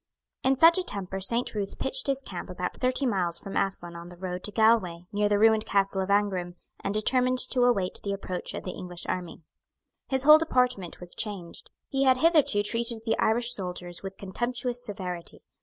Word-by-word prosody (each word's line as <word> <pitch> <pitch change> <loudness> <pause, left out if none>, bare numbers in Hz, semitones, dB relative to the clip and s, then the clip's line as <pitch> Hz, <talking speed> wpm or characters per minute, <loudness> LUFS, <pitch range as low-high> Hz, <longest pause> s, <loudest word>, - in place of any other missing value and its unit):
In 265 +1 +2
such 330 +6 +6
a - - 0
temper 195 - -3
Saint 230 +6 +1
Ruth 205 -2 -4
pitched - - +1
his 275 0 -1
camp 185 -8 -7
about 180 0 -4
thirty 255 +2 +1
miles 180 -8 0
from 195 - -7
Athlone 185 -3 -2
on 170 +1 -9
the 175 - -13
road 180 0 -5
to 210 - -2
Galway, 220 -6 +2
near 205 0 +1
the 205 - +2
ruined 220 0 +4
castle 195 -1 +1
of 190 - -4
Aghrim, 190 -4 0 0.3
and - - -1
determined 250 +4 +2
to 250 0 +2
await 195 -7 +1
the 200 - -3
approach 190 -2 -4
of - - -6
the 185 - -4
English 180 -1 -7
army. 175 -2 -5 0.6
His 265 -1 +3
whole 305 +2 +9
deportment 250 - 0
was 180 -1 -7
changed. 195 -6 -4 0.2
He 270 - -2
had 260 -1 +5
hitherto 300 -9 +3
treated 230 +1 0
the 225 - +1
Irish 235 +2 +1
soldiers 180 -3 -4
with 195 0 -8
contemptuous 240 +5 -3
severity. 185 -6 -6
205 Hz, 190 wpm, -27 LUFS, 185-245 Hz, 0.6 s, whole